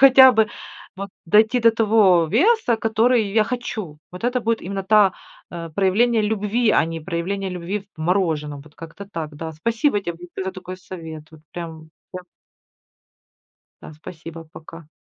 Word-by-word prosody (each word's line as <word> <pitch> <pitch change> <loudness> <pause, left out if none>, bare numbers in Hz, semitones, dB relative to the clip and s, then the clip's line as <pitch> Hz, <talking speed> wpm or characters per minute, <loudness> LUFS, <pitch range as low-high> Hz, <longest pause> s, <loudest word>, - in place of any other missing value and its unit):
хотя 260 -1 +9
бы, 220 -1 +3 0.5
вот 200 +1 -5 0.2
дойти 220 +7 +4
до 230 -1 +5
того 210 -6 +4
веса, 435 - +3
который 225 0 +2
я 220 -1 +4
хочу. 215 -9 -5
Вот 180 - -9
это 250 +1 0
будет 230 0 -1
именно 195 +1 -4
та, 205 -2 +5 0.4
э, 170 -1 -6
проявление 215 +4 +2
любви, 215 +2 +1
а - - +4
не 165 0 -5
проявление 190 +4 -3
любви 180 +3 -4 0.2
в - - -11
мороженом. 155 -5 0
Вот, 150 +1 -18
как-то 165 +5 -10
так, 155 -4 -5
да. 160 +2 -6
Спасибо 225 - 0
тебе 175 -1 -7
за 190 0 -3
такой 185 0 -8
совет, 160 -4 -9
вот 155 - -15
прям, 160 -2 -8 0.2
я 185 - -6 1.6
Да, - - -10
спасибо, 165 +1 -10
пока. 160 0 -13
190 Hz, 155 wpm, -21 LUFS, 165-220 Hz, 1.6 s, хотя